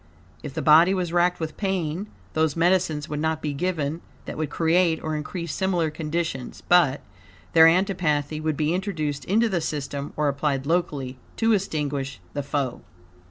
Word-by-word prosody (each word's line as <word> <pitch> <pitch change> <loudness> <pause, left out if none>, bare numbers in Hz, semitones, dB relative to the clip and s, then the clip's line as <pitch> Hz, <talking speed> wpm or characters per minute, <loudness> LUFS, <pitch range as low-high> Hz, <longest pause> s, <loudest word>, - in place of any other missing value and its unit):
If - - -8
the - - -2
body 165 +5 +6
was 175 -2 -2
racked 175 +1 +2
with 160 -1 -4
pain, 190 -1 -2 0.3
those 160 -2 +1
medicines 170 -3 +2
would 150 0 -3
not 160 0 0
be 150 -2 -3
given 160 0 -2 0.2
that - - -6
would 155 -2 -2
create 165 0 +2
or 155 0 -2
increase 165 +2 -4
similar 175 -5 0
conditions, 155 -4 -4
but, 165 -6 +4 0.5
their 160 -1 +8
antipathy 165 -5 +1
would 155 -2 -1
be 155 +1 +1
introduced 165 -7 -2
into 225 +5 +3
the 185 -6 -1
system 140 -2 -4
or 150 0 +1
applied 140 -1 0
locally 140 -6 -1 0.2
to 225 0 +3
extinguish 145 - -2
the 145 - -2
foe. 140 -3 -2
160 Hz, 160 wpm, -24 LUFS, 145-175 Hz, 0.5 s, their